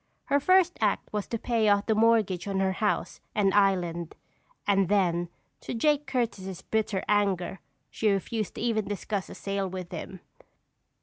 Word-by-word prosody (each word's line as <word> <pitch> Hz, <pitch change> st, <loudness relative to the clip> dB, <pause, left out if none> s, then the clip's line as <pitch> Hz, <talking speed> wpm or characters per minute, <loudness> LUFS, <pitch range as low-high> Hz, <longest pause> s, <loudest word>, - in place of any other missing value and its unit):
Her 285 Hz, -, +2 dB
first 370 Hz, +3 st, +3 dB
act 210 Hz, -1 st, 0 dB
was 210 Hz, -1 st, -2 dB
to 230 Hz, -, -2 dB
pay 225 Hz, -2 st, +1 dB
off 205 Hz, 0 st, +3 dB
the 220 Hz, -, +2 dB
mortgage 215 Hz, -5 st, +2 dB
on 195 Hz, -1 st, -1 dB
her 190 Hz, 0 st, +2 dB
house 210 Hz, +2 st, -1 dB
and 195 Hz, -2 st, +3 dB
island, 175 Hz, -4 st, +1 dB, 0.5 s
and 195 Hz, -3 st, +2 dB
then, 175 Hz, -4 st, +2 dB, 0.3 s
to -, -, -5 dB
Jake 295 Hz, +4 st, +2 dB
Curtis' 200 Hz, -8 st, -2 dB
bitter 215 Hz, -3 st, -1 dB
anger, 195 Hz, -3 st, +1 dB, 0.3 s
she 220 Hz, -, +1 dB
refused 205 Hz, +2 st, -1 dB
to -, -, -6 dB
even 220 Hz, -3 st, 0 dB
discuss 205 Hz, -1 st, -3 dB
a -, -, -9 dB
sale 195 Hz, -1 st, -2 dB
with 185 Hz, -1 st, -6 dB
him. 180 Hz, +2 st, -7 dB
205 Hz, 165 wpm, -28 LUFS, 190-220 Hz, 0.5 s, first